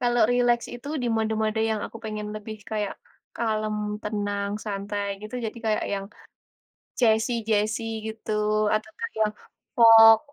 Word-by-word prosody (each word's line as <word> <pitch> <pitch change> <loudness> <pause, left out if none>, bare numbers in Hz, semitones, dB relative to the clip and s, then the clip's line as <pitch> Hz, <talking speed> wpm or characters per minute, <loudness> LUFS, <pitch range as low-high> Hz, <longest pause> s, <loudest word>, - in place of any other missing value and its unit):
kalau 240 -1 +2
rileks 245 -1 +2
itu 260 +4 -8
di 245 - -1
mode-mode 220 0 0
yang 215 -1 -1
aku - - -10
pengen 210 -1 -4
lebih 215 +1 -7
kayak 210 -2 -2 0.4
kalem, 215 -2 -1 0.3
tenang, 205 -1 -2
santai 200 0 -3 0.2
gitu. 215 +3 -8
Jadi 220 - -6
kayak, 215 -1 +1
yang 195 -1 -2 1.0
jazzy-jazzy 220 -1 +1 0.2
gitu, 220 0 -6 0.4
atau 215 0 -1
kayak - - -4
yang 215 -1 +2 0.4
folk. 225 -1 +9
215 Hz, 135 wpm, -25 LUFS, 210-225 Hz, 1.0 s, folk